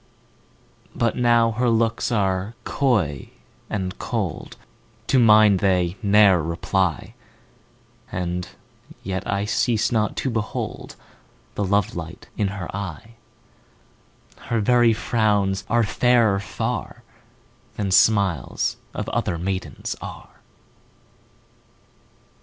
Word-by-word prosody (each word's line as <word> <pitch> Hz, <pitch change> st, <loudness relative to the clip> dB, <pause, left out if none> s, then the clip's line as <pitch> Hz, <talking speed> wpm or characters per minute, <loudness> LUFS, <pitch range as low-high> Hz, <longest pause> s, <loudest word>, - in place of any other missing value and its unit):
But 115 Hz, -1 st, 0 dB
now 120 Hz, -2 st, +3 dB
her 120 Hz, +2 st, 0 dB
looks 115 Hz, +1 st, +1 dB
are 100 Hz, 0 st, 0 dB
coy 105 Hz, -, 0 dB, 0.4 s
and 95 Hz, -2 st, -4 dB
cold, -, -, -4 dB, 0.5 s
To 130 Hz, -, +3 dB
mine 105 Hz, -3 st, +6 dB
they 90 Hz, -2 st, +1 dB
ne'er 100 Hz, -4 st, +5 dB
reply, 90 Hz, +4 st, -1 dB, 1.0 s
And 90 Hz, 0 st, -3 dB, 0.5 s
yet 95 Hz, -1 st, -3 dB
I 100 Hz, +1 st, -1 dB
cease 115 Hz, +1 st, +1 dB
not 110 Hz, -3 st, 0 dB
to 130 Hz, -, -1 dB
behold 110 Hz, -1 st, -4 dB, 0.6 s
The 105 Hz, -, -2 dB
love 100 Hz, +2 st, +1 dB
light 85 Hz, 0 st, -8 dB
in 105 Hz, -, 0 dB
her 95 Hz, -3 st, -6 dB
eye: 100 Hz, +1 st, -6 dB, 1.3 s
10 -, -, -16 dB
Her 115 Hz, -, 0 dB
very 120 Hz, +2 st, +4 dB
frowns 105 Hz, -4 st, 0 dB
are 120 Hz, 0 st, +3 dB
fairer 115 Hz, -2 st, +3 dB
far 100 Hz, -, -4 dB, 0.7 s
Than 100 Hz, -2 st, -2 dB
smiles 95 Hz, -, +2 dB, 0.2 s
of -, -, -4 dB
other 85 Hz, -, -1 dB
maidens 95 Hz, +2 st, -4 dB
are. -, -, -10 dB
100 Hz, 105 wpm, -23 LUFS, 95-115 Hz, 1.3 s, mine